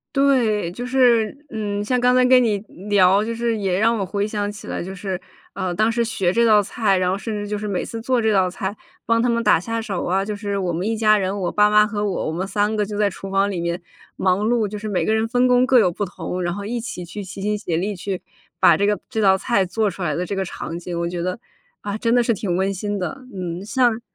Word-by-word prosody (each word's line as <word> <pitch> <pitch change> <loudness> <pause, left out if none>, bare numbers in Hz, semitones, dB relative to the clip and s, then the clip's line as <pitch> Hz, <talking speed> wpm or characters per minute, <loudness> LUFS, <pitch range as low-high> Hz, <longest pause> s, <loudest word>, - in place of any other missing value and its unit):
对， 240 -9 +2
就 240 +8 -6
是， 245 -3 +3
嗯， 205 -2 -3
像 250 +3 +1
刚 250 +1 +4
才 255 0 +5
跟 255 0 +6
你 215 -3 +1 0.3
聊， 200 0 +4
就 230 +1 -3
是 230 -1 -1
也 190 -3 0
让 230 +1 +3
我 195 - -2
回 200 +2 -1
想 205 -1 -2
起 210 - -11
来， - - -3
就 190 +2 -6
是， 190 -1 -4 0.3
呃， 180 -1 -2
当 215 +5 +2
时 235 +1 +1
学 195 -6 0
这 235 +3 +3
道 210 -2 +6
菜， 200 -1 +1
然 180 0 +1
后 190 - -1
甚 220 +1 -4
至 205 0 -4
就 210 0 -2
是 210 - -5
每 195 -3 -2
次 230 - -6
做 245 +1 +1
这 220 0 +2
道 190 -2 +3
菜， 190 +2 -4 0.3
帮 230 +1 +3
他 245 - +2
们 235 0 +1
打 - - +5
下 225 +6 -3
手 200 -5 -3
啊， 190 +2 +1
就 210 0 -4
是 205 -1 -3
我 185 -3 -1
们 175 +4 -2
一 225 0 0
家 215 -1 +4
人， 195 0 -1
我 185 -3 -1
爸 210 0 +4
妈 210 0 +5
和 210 -1 -2
我， 190 - -2
我 - - 0
们 180 +4 -3
3 210 +2 0
个 210 -1 0
就 205 0 -5
在 205 -1 +2
厨 195 - -8
房 195 +1 +1
里 185 -3 -3
面 170 +1 -2 0.3
忙 185 -1 +1
碌， 230 -2 +1
就 210 +1 -6
是 215 +1 -5
每 195 -4 0
个 - - +1
人 220 0 +1
分 245 +2 +2
工 250 0 +4
各 255 -2 +5
有 180 - +3
不 205 +4 -3
同。 180 -1 -5
然 175 -1 -1
后 200 +1 -6
一 235 +4 -3
起 225 -6 -6
去 190 +4 -7
齐 190 +1 -8
心 210 +1 0
协 170 -5 -2
力 200 +4 -2
去 185 +1 -4 0.4
把 - - +6
这 200 - +1
个 210 0 +2
这 220 - -1
道 190 -2 +5
菜 200 0 +1
做 210 +3 0
出 190 - -11
来 155 -3 0
的 175 - -1
这 195 +3 -4
个 195 - 0
场 170 -2 -6
景， 175 0 -6
我 170 - -1
觉 175 0 -4
得， 185 +5 -3 0.4
啊， 205 +1 -4
真 230 +1 +1
的 245 - +4
是 235 - +2
挺 195 -4 -2
温 190 +2 +1
馨 205 +1 -3
的， 260 +9 -5
嗯， 180 -1 -5
像 240 -2 +2
205 Hz, 295 characters per minute, -21 LUFS, 190-225 Hz, 0.4 s, 跟